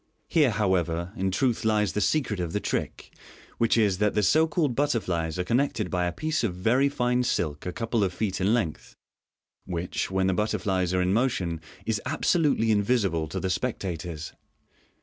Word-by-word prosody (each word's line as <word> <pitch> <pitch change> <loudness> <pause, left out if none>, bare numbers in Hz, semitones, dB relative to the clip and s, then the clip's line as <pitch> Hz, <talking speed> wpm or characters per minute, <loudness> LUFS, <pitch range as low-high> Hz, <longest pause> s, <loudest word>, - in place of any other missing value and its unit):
Here, 150 -5 +3
however, 90 -4 0
in 95 0 0
truth 120 +5 0
lies 105 -3 +2
the 105 - -1
secret 125 -10 0
of 85 -2 -3
the 105 - +1
trick, - - -4 0.5
which 115 0 +3
is, 100 -4 +2
that 105 -1 +1
the 105 - +2
so 160 +9 +4
called 150 -4 0
butterflies 95 - 0
are 90 - 0
connected 115 -2 0
by 90 -1 +1
a - - -1
piece 155 - -2
of 90 -4 -3
rery 130 +5 +4
fine 125 -2 +1
silk 85 -11 -1
a - - -1
couple 115 +1 -1
of 95 - 0
feet 95 0 -2
in 95 +3 +2
length, 110 -10 -2 0.7
which, 90 -1 -3
when 95 0 +1
the 95 - +2
butterflies 95 -3 0
are 90 - +2
in 90 +1 +1
motion, 95 -9 0 0.2
is 110 -2 -1
absolutely 150 -5 +2
invisible 100 -7 +1
to 75 - -4
the 95 - -1
spectators. 90 -7 -4
105 Hz, 180 wpm, -26 LUFS, 90-120 Hz, 0.7 s, so